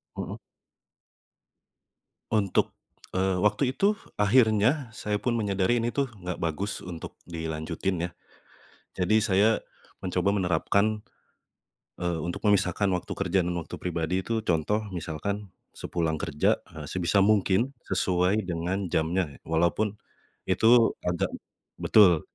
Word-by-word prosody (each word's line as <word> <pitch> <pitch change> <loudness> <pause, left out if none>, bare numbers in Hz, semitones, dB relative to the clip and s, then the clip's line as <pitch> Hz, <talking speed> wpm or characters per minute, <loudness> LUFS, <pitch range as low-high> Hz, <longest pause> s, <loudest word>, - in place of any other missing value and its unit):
Mhm. - - -5 1.9
Untuk, 105 -4 +1 0.4
eee, 95 -1 +1
waktu 125 +5 +2
itu 205 +7 +2 0.2
akhirnya, 110 +4 +3
saya 105 -3 -2
pun 120 +3 -1
menyadari 105 +1 +1
ini 115 - 0
tuh, 135 -2 -2
nggak 90 -3 -5
bagus 85 +5 -2
untuk 85 -3 -8
dilanjutin 85 +2 -3
ya, - - -5 0.9
jadi 95 +3 +2
saya 100 0 +4 0.5
mencoba 95 +1 0
menerapkan, 100 +3 +1 1.0
eee, 85 -1 0
untuk 85 +3 -4
memisahkan 100 -1 +2
waktu 90 -1 -2
kerja 95 -1 0
dan 90 - -1
waktu 85 -1 -5
pribadi 85 -1 -2
itu, 115 -1 -1
contoh 90 +5 +1
misalkan 90 +4 -4 0.2
sepulang 80 -2 -2
kerja, 75 -1 +1 0.2
eee, - - -7
sebisa 95 +2 +2
mungkin 105 +4 +3 0.2
sesuai 90 +4 +1
dengan 90 +1 -2
jamnya, 80 -1 0
walaupun 85 +6 +1 0.5
itu 115 +5 +5
agak 90 -1 -1 0.5
betul. 90 -7 +6
95 Hz, 115 wpm, -27 LUFS, 85-105 Hz, 1.9 s, betul